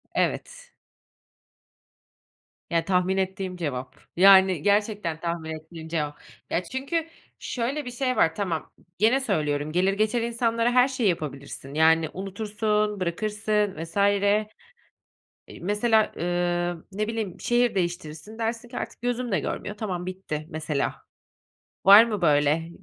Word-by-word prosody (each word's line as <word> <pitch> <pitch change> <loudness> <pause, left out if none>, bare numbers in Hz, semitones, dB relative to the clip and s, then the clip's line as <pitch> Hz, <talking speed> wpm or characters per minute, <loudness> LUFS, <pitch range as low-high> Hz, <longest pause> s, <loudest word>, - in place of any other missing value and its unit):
Evet. - - -2 2.0
Ya 165 -1 +1
tahmin 185 +1 +1
ettiğim 190 -1 -2
cevap. 135 -6 -4 0.2
Yani 190 -2 +7
gerçekten 205 -4 0
tahmin 170 -1 -3
ettiğim 160 +1 -10
cevap. 150 -3 -3 0.3
Ya 180 - 0
çünkü 275 - -3 0.3
şöyle 265 +4 -3
bir 245 - -5
şey 255 +1 -1
var. 160 -6 +3
Tamam. 175 -6 -3 0.3
Gene 230 +5 +4
söylüyorum. 150 - -1
Gelir 185 +4 +2
geçer 215 +4 +1
insanlara 230 0 +1
her 250 +1 +5
şeyi 255 -6 +1
yapabilirsin. 140 -4 -5
Yani 160 +1 +4
unutursun, 210 +1 -1
bırakırsın 210 +3 -1
vs. 165 +4 -9
Eee, 200 +1 +3 1.1
mesela, 215 +4 +2
ııı, 175 -1 -1
ne 210 +2 -2
bileyim 225 -4 -4
şehir 240 -1 +2
değiştirirsin 175 +2 -4
dersin 230 +1 -3
ki 245 - -8
artık - - -6
gözüm 245 0 -2
de 190 - +2
görmüyor 205 0 -4
tamam 185 -5 -3
bitti 180 -5 -5
mesela. 155 -3 -2 0.9
Var 200 +3 +10
mı 210 -4 -3
böyle 150 +1 +2
195 Hz, 125 wpm, -25 LUFS, 165-220 Hz, 2.0 s, Var